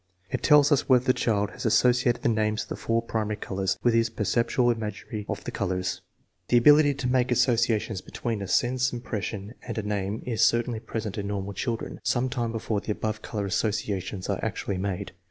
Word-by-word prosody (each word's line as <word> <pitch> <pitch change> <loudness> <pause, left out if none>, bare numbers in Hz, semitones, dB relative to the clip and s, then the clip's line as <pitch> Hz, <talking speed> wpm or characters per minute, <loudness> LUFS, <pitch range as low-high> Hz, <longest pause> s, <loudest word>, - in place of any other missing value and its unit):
It - - -1
tells 150 0 +6
us 145 - +2
whether 125 -1 +5
the 130 - +4
child 105 -4 0
has - - -8
associated 120 +1 +3
the - - +2
names 110 -1 +1
of - - -15
the - - -3
four 115 0 -1
primary 110 -2 -2
colors 95 -2 -2
with 120 - +4
his 115 0 +3
perceptual 120 +3 +1
imagery 110 -1 -5
of - - -3
those - - -5
colors. 95 -2 -2 0.5
The 120 - +4
ability 145 +3 +6
to 130 - -3
make 125 0 +2
simple - - +3
associations 115 -5 +1
between 115 -4 -4
a 100 - -4
sense 125 +7 +1
impression 110 -3 -5
and 115 - -6
a 110 - -1
name 105 0 -2
is 115 -3 -1
certainly 115 0 +2
present 110 -2 -4
in 100 - -3
normal 100 0 -3
chil 115 +4 -1
dren - - -8
some 130 +1 +1
time 120 -3 -2
before 110 -2 -2
the 105 - -2
above 110 0 -3
color 105 -2 -3
associations 100 -1 -2
are - - -2
actually 95 -2 -2
made. 100 0 -3
115 Hz, 205 wpm, -26 LUFS, 105-120 Hz, 0.5 s, tells